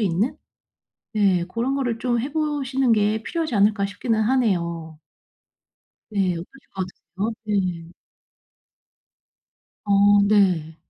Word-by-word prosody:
있는 200 +4 0 0.8
네 195 -5 +2
고런 235 +8 -2
거를 245 -5 -1
좀 240 -1 0
해 270 +5 -3
보시는 275 -5 0
게 215 +1 +1
필요하지 320 -5 -2
않을까.' 205 0 +3
싶기는 220 +3 -1
하네요. 170 -10 0 1.1
네. 195 -3 +1
어떠실 170 +2 -6 0.3
것 190 -1 -2 0.3
같으세요? 205 +5 -1
네. 185 -5 -2 1.9
어 205 - 0 0.4
네. 180 -7 +2
210 Hz, 210 characters per minute, -23 LUFS, 185-240 Hz, 1.9 s, 않을까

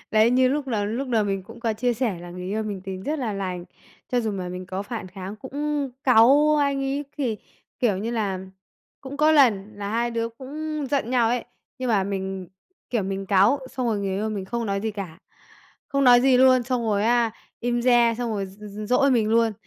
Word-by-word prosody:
Đấy, 220 +2 +4
như 255 +1 +4
lúc 285 +1 -1
lầu 215 -5 -1
lúc 245 +6 -3
đầu 225 -4 +2
mình 195 -1 -2
cũng 230 +5 -13
có 230 -2 0
chia 240 +3 0
sẻ 225 -6 -1
là 175 0 -9
người 180 +1 -7
yêu 210 +3 -1
mình 205 -3 -4
tính 190 0 -6
rất 305 +8 -2
là 240 -6 -2
lành, 185 -3 -4 0.5
cho 245 - +3
dù 220 -2 -1
mà 185 -2 -4
mình 180 +1 -6
có 185 +1 -4
phản 215 -2 -6
kháng, 190 +2 -8
cũng 285 +3 -3
cáu 275 +5 +6
anh 280 -2 +1
ấy 275 +2 -2
thì 245 -6 -1 0.4
kiểu 225 -6 +2
như 220 +4 -3
là, 205 -5 -1 0.6
cũng 270 +1 -8
có 305 +2 +4
lần 215 -9 +4
là 200 0 -5
hai 235 +2 0
đứa 230 0 -1
cũng 295 +5 -5
giận 275 -5 0
nhau 240 -3 +3
ấy, 245 0 -1 0.3
nhưng 255 - -2
mà 205 -4 +2
mình, 190 -2 -4 0.4
kiểu, 230 -4 0
mình 195 0 -4
cáu 200 +8 +4
xong 255 -2 -2
rồi 220 -3 0
người 195 -1 -2
yêu 215 +2 -1
mình 205 -3 -4
không 235 +4 -3
nói 200 -1 -1
gì 220 +2 -2
cả, 195 -6 -7 0.7
không 275 0 +1
nói 245 -1 +8
gì 260 0 +4
luôn, 255 0 +6
xong 245 0 -1
rồi, 205 -1 +1
á, 235 0 +3 0.3
im 240 0 0
re, 240 -2 +4
xong 240 -1 -2
rồi 200 -3 -2
d 190 +2 -15
d 205 0 -8
dỗi 275 +3 +4
mình 230 -4 +2
luôn. 230 0 +3
230 Hz, 230 wpm, -24 LUFS, 200-255 Hz, 0.7 s, nói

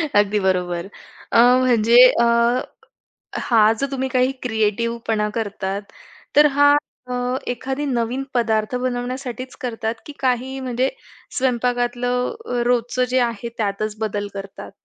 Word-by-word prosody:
अगदी 205 0 +3
बरोबर. 180 -1 -1 0.5
अ, - - +5 0.2
म्हणजे 235 -2 +4 0.2
अ, - - +4 1.2
हा 220 -5 +4
जो 275 - +1
तुम्ही 265 0 -2
काही 255 0 +2
क्रिएटिव्हपणा 220 -1 -1
करतात, 200 -2 -3 0.5
तर 295 +1 +7
हा 285 0 +6 0.4
अ, - - -1 0.4
एखादी 270 +3 -3
नवीन 250 0 -1
पदार्थ 225 -1 0
बनवण्यासाठीच 250 0 -4
करतात, 225 -2 -3
की 295 - -9
काही 260 +1 -1
म्हणजे 255 0 -1 0.5
स्वयंपाकातलं 245 - 0 0.3
रोजचं 245 +1 +1
जे 255 0 +2
आहे 235 -1 -1
त्यातच 210 0 -2
बदल 205 -1 -2
करतात? 195 -1 -8
240 Hz, 115 wpm, -21 LUFS, 215-255 Hz, 1.2 s, तर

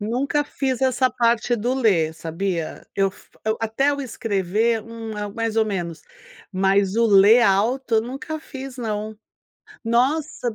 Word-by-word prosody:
Nunca 255 +7 0
fiz 265 -3 -2
essa 260 0 +2
parte 235 0 +1
do 240 +4 -1
ler, 180 -11 +2
sabia? 165 +1 -4
Eu 195 0 +2
fi - - -20 0.2
eu 220 0 0
até 225 +6 +1
o 280 - -5
escrever, 220 -2 -1
hum, 230 -1 -8
ah, 210 0 -3
mais 225 +1 -3
ou 220 - +4
menos, 175 -5 -4 0.5
mas 195 +1 +2
o 230 0 +4
ler 210 +3 +6
alto 230 +5 +2
eu - - +4
nunca 275 +6 -6
fiz 265 -3 -9
não, 215 -2 -4 0.7
nossa 250 +1 0
225 Hz, 155 wpm, -22 LUFS, 200-250 Hz, 0.7 s, ler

